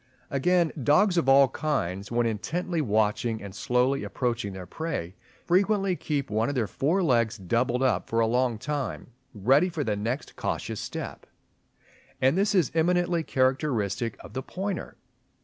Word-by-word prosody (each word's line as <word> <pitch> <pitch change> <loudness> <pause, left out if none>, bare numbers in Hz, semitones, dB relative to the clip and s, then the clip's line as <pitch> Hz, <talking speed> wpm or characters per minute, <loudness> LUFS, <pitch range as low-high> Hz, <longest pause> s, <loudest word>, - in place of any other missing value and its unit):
Again, 170 +4 +2
dogs 175 - +4
of 165 -6 +2
all 135 0 +7
kinds 100 - -2
when 120 0 +2
intently 165 - -2
watching 110 -1 +1
and 100 -2 -9
slowly 125 +6 +1
approaching 120 -4 -2
their 95 -1 -8
prey, 95 - -4 0.3
frequently 195 +1 +2
keep 145 -8 -3
one 110 +3 +1
of 145 - -3
their 120 -4 +1
fore 145 - 0
legs 115 -6 +2
doubled 120 +7 0
up 130 - +1
for 115 - +1
a 115 - +4
long 120 0 +1
time, 140 0 -4 0.2
ready 135 - +3
for 165 -4 -3
the 110 -5 -1
next 115 +6 -3
cautious - - -3
step; - - -6 0.9
and 130 +4 +3
this 200 +2 +2
is 175 -7 +3
eminently 175 +1 +2
characteristic 130 -6 0
of - - -12
the 130 - -3
pointer. 195 +8 -5
130 Hz, 155 wpm, -27 LUFS, 115-165 Hz, 0.9 s, all